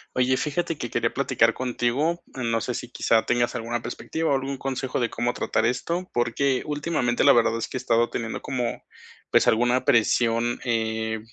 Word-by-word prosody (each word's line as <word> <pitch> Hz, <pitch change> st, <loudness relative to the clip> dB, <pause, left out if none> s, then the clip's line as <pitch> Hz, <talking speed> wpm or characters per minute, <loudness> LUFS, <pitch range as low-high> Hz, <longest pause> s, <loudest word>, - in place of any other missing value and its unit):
Oye, 130 Hz, +1 st, +2 dB
fíjate 165 Hz, +3 st, -2 dB
que 120 Hz, -5 st, -5 dB
quería -, -, 0 dB
platicar -, -, +2 dB
contigo, 130 Hz, +7 st, 0 dB
mm, 120 Hz, -3 st, -2 dB
no 115 Hz, -1 st, +1 dB
sé 125 Hz, -, -3 dB
si -, -, -5 dB
quizá 115 Hz, -2 st, +2 dB
tengas 120 Hz, 0 st, +1 dB
alguna 120 Hz, 0 st, -3 dB
perspectiva 160 Hz, +6 st, -3 dB
o -, -, +4 dB
algún 135 Hz, +1 st, -3 dB
consejo 130 Hz, -1 st, -2 dB
de 120 Hz, -2 st, 0 dB
cómo 120 Hz, 0 st, -1 dB
tratar 110 Hz, -, 0 dB
esto, 170 Hz, +10 st, -1 dB
porque 125 Hz, +2 st, +1 dB
últimamente, 145 Hz, -5 st, 0 dB
la -, -, +7 dB
verdad 115 Hz, -1 st, +3 dB
es 115 Hz, -, -3 dB
que -, -, -5 dB
he -, -, -3 dB
estado 120 Hz, -2 st, +1 dB
teniendo 115 Hz, -2 st, -3 dB
como, 125 Hz, -3 st, -3 dB, 0.5 s
pues, -, -, +4 dB
alguna 120 Hz, +3 st, +3 dB
presión, 115 Hz, +1 st, +2 dB
eh, 110 Hz, -1 st, -1 dB
120 Hz, 185 wpm, -25 LUFS, 115-135 Hz, 0.5 s, la